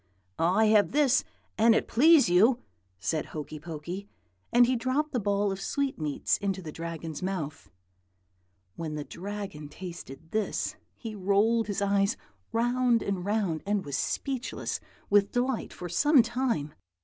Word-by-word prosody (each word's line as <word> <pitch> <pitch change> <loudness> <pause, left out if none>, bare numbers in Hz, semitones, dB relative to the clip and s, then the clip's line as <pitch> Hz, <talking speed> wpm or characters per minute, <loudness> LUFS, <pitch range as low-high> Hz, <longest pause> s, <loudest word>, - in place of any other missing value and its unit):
"'I 180 +7 +3
have 215 +1 +4
this, 280 -3 +4 0.4
an 225 +1 +6
it - - +1
please 305 +5 +6
you,' 210 +8 +5 0.4
said 155 - -1
Hokey 155 0 -6
Pokey; 170 +5 -6 0.4
and 240 +1 +6
he 255 +1 +1
dropped 260 +6 0
the 250 - 0
ball 200 -1 +1
of 195 0 -5
sweetmeats 195 - -1
into 195 -1 -1
the 165 -4 -7
Dragon's 165 -1 -6
mouth. 160 -5 -4 1.1
"When 155 -2 -4
the 150 - -3
Dragon 190 -4 -6
tasted 165 -3 -9
this, 215 -1 -1 0.2
he 225 -3 -7
rolled 205 +3 +2
his 205 0 -1
eyes 200 +1 +2 0.3
round 240 0 +2
and 195 -3 -2
round, 200 -6 0
and 205 -1 0
was 140 -2 -3
speechless 265 - -2 0.3
with 200 -1 +4
delight 250 -1 -1
for 180 - -7
some 275 - +5
time. 230 - -1
200 Hz, 145 wpm, -28 LUFS, 170-235 Hz, 1.1 s, an